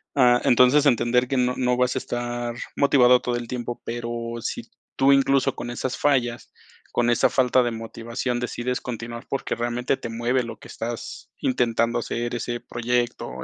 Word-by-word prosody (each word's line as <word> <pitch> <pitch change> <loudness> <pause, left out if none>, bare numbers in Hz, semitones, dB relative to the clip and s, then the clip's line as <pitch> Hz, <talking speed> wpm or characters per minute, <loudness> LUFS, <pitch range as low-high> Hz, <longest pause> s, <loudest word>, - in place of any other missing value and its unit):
Ah, 125 -3 +5
entonces, 125 +4 +5
entender 125 -1 +3
que 135 +1 -1
no 125 0 +2
no 125 -1 +1
vas 125 +1 +1
a 130 - +1
estar 120 -1 -4 0.2
motivado 125 -3 +5
todo 120 -1 -1
el 120 -1 -4
tiempo, 120 -1 -4
pero 120 0 -4 0.3
sí - - -4 0.3
tú 135 +1 +4
incluso 135 0 +3
con 120 - -6
esas 125 +1 -3
fallas, 125 -5 0 0.4
con 120 0 +2
esa 120 - +3
falta 130 0 +3
de 120 - -1
motivación 115 +2 -4
decides 125 +1 -2
continuar 115 -1 -7
porque 135 - -2
realmente 120 +3 -1
te - - -6
mueve 120 +3 0
lo 115 - -7
que - - -14
estás 115 0 -6
intentando 120 -1 +1
hacer, 120 +1 -3
o 120 - -1
ese 120 +1 -3
proyecto, 120 - -2
120 Hz, 175 wpm, -24 LUFS, 120-125 Hz, 0.4 s, Ah